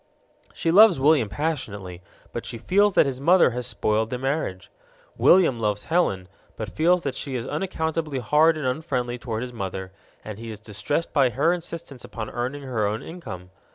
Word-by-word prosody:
She 165 - -1
loves 200 -3 +7
William 140 -6 +4
passionately, 100 - -4 0.3
but - - -4
she 115 - -6
feels 195 - +2
that - - +6
his 135 -1 -3
mother 170 -1 +5
has 125 +1 -3
spoiled 110 -1 0
their 125 - -3
marriage. 135 - -3 0.4
William 170 -10 +5
loves 105 -2 -1
Helen, 100 - 0 0.3
but 110 -3 -6
feels 175 +3 +3
that 140 - -2
she 135 -3 -5
is 120 -1 -3
unaccountably 160 -2 -2
hard 150 +6 +3
and 150 - -4
unfriendly 125 -3 -2
toward 115 -1 -4
his 125 -1 -7
mother, 95 -3 -5 0.3
and 105 -1 -7
he 115 0 -7
is 110 -2 -7
distressed 110 +9 -3
by 135 -3 +4
her 145 +8 +2
insistence 165 -7 -7
upon 110 -2 -6
earning 130 +4 -4
her 115 -6 -1
own 105 +2 -3
income. 90 - -9
130 Hz, 180 wpm, -24 LUFS, 110-160 Hz, 0.4 s, loves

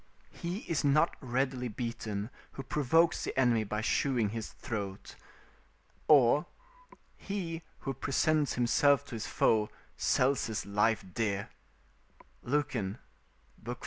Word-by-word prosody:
["He 175 +5 -5
is 165 -4 -2
not 150 +4 +3
readily 130 -1 -1
beaten 115 -2 -4 0.2
who 135 - -6
provokes 150 +5 +2
the - - -4
enemy 120 -4 +3
by 105 +1 -3
shewing 120 -2 +1
his 110 0 -5
throat." 100 -4 -5 0.9
or: 145 +1 +5 0.7
"He 175 -5 -4 0.2
who 135 - -3
presents 145 +3 +1
himself 140 +4 +3
to - - -14
his 110 -2 -4
foe, 105 -1 +2 0.3
sells 135 +2 +2
his 110 0 -3
life 105 +2 +1
dear." 100 -2 -1 0.9
Lucan, 120 -7 -1 0.7
iv. - - -5
125 Hz, 115 wpm, -31 LUFS, 110-145 Hz, 0.9 s, or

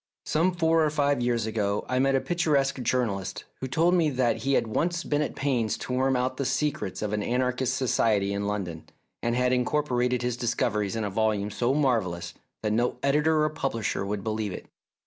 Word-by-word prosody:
Some 170 +4 +2
four 165 -1 +3
or 155 - +3
five 145 -3 +1
years 120 -2 +1
ago 105 -2 -1
I 125 0 0
met 135 +1 +3
a - - +4
picturesque 140 -5 +1
journalist 115 -6 -1 0.2
who 130 - -3
told 165 +7 +2
me 170 -4 +3
that 125 -4 +1
he 135 +1 -1
had - - +3
once 170 +10 -1
been 145 0 0
at 150 - -2
pains 125 -6 0
to 125 - -5
worm 130 +1 +2
out 125 +1 -1
the 140 - -1
secrets 145 -7 -1
of 105 0 -2
an 105 - 0
anarchist 125 +2 0
society 110 -6 +1
in 100 0 -2
London, 90 -6 -4 0.3
and 120 0 0
had 125 0 +2
incorporated 125 -2 +1
his 120 -1 -1
discoveries 110 -4 0
in 110 - -1
a 100 - -2
volume 105 -1 0
so 120 +6 0
marvellous 115 -12 0 0.3
that 105 -1 +1
no 120 +3 +1
editor 150 +2 +3
or 155 - +2
pub 140 -2 -2
lisher 110 -3 -1
would 100 0 -3
believe 110 -3 -2
it. - - -8
125 Hz, 205 wpm, -27 LUFS, 110-140 Hz, 0.3 s, a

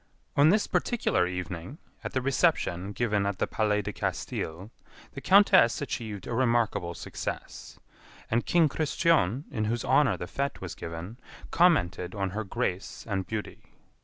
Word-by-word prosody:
On 145 +2 +6
this 210 +4 +3
particular 230 - +1
evening, 90 - -5 0.3
at - - -5
the 130 - -1
reception 130 - +1
given 105 -2 0
at 100 -1 -2
the - - +1
Palais 105 -1 0
de - - -4
Castille, 90 +7 -4 0.4
the 135 - -7
Countess 190 - +5
achieved 110 -8 -5
a - - -4
remarkable 115 -8 +1
success; - - -6 0.5
and 115 +2 +2
King 170 -2 +4
Christian, 150 - +1
in 110 -6 -1
whose 115 +2 -1
honor 145 -6 +3
the - - -5
fête 140 +9 -3
was - - -6
given, 85 +8 -7 0.3
commented 90 - +2
on 95 -2 -2
her 110 +3 -3
grace 95 -1 -3
and 95 -3 -2
beauty. 110 -2 -5
110 Hz, 150 wpm, -28 LUFS, 95-140 Hz, 0.5 s, On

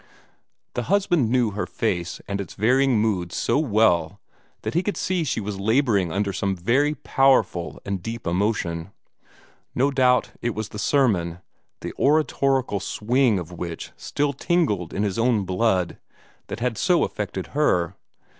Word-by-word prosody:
The 120 +3 -4
husband 175 - +2
knew 120 -3 +2
her 105 +2 -3
face 90 -6 -2
and 100 0 -2
its 95 - -9
varying 130 +3 +3
moods 95 -6 0
so - - +1
well 105 - +2 0.4
that - - -3
he 170 - +2
could 205 +2 -3
see 180 -2 0
she 135 - -1
was 100 -2 -5
laboring 110 - +2
under 100 +2 -1
some 95 +1 -1
very 130 - +1
powerful 135 - +2
and 100 -2 -3
deep 115 +4 -6
emotion. 90 -1 -1 0.8
No 135 +3 +2
doubt 125 -2 +3
it 120 -2 -2
was 110 -1 -4
the 105 - -7
sermon, 100 - +1 0.4
the - - -5
oratorical 135 -6 +2
swing 115 +3 +1
of 90 -1 -6
which 85 -1 -6
still 145 0 -1
tingled 135 - 0
in 100 - -1
his 100 0 -1
own 115 -4 +2
blood, 95 -1 0 0.5
that 115 - -6
had 120 -3 -1
so 180 -2 +3
affected 95 -2 -4
her. 95 - +1
110 Hz, 155 wpm, -24 LUFS, 95-135 Hz, 0.8 s, varying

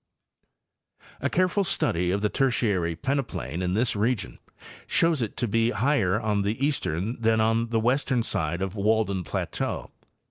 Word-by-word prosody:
A 140 - 0
careful 185 +4 +2
study 90 - 0
of 100 +2 0
the 105 - +1
Tertiary 105 -11 +1
peneplain 130 - -2
in 90 0 0
this 115 +1 +1
region 105 - -1 0.5
shows 165 -4 +2
it 110 - -3
to 120 - 0
be 115 +2 +2
higher 120 -7 +1
on 105 -3 0
the 105 +4 -1
eastern 115 - -2
than 110 0 +3
on 115 +1 +2
the 115 -1 +1
western 125 +1 +1
side 85 -2 -2
of 95 +1 -4
Walden 105 -2 +1
plateau. 75 - -3
110 Hz, 150 wpm, -26 LUFS, 95-125 Hz, 0.5 s, than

